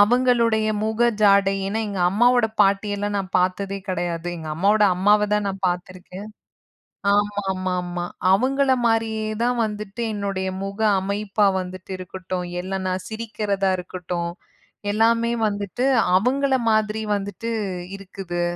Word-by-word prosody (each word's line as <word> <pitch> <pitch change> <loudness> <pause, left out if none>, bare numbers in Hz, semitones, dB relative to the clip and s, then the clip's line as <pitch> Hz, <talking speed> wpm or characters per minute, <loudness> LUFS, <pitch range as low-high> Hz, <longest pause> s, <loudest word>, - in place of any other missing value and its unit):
அவுங்களுடைய 230 -1 +3 0.2
முக 220 +1 -2 0.2
ஜாடை. 200 -1 +5
ஏன்னா, 210 +3 -1
எங்க 200 -2 -3
அம்மாவோட 240 +3 +4
பாட்டி 200 +1 +3
எல்லாம் 205 0 -2
நான் 190 -1 -5
பாத்ததே 190 +2 -1
கெடையாது. 175 -1 -2
எங்க 160 -2 -7
அம்மாவோட 205 +5 +3
அம்மாவ 210 +3 +4
தான் 210 -1 0
நான் 195 0 -5
பாத்திருக்கேன். 185 +3 -6 0.9
ஆமாமாமா. 185 -3 -1 0.3
அவுங்கள 265 +6 +3
மாரியே 225 -1 0
தான் 245 0 +1
வந்துட்டு 210 +1 -5
என்னுடைய 195 -2 -2 0.2
முக 195 +2 -6 0.2
அமைப்பா 200 +1 0
வந்துட்டு 185 +1 -8
இருக்கட்டும், 185 0 -5 0.2
இல்ல 190 +2 -5
நான் 185 0 -2
சிரிக்கிறதா 210 -3 -1
இருக்கட்டும். 180 -1 -4 0.6
எல்லாமே 230 +2 +2
வந்துட்டு 205 +4 -2 0.3
அவுங்கள 265 +6 +2 0.2
மாதிரி 215 0 +1
வந்துட்டு 205 +3 -4 0.5
இருக்குது. 185 -3 -5
200 Hz, 120 wpm, -23 LUFS, 185-220 Hz, 0.9 s, ஜாடை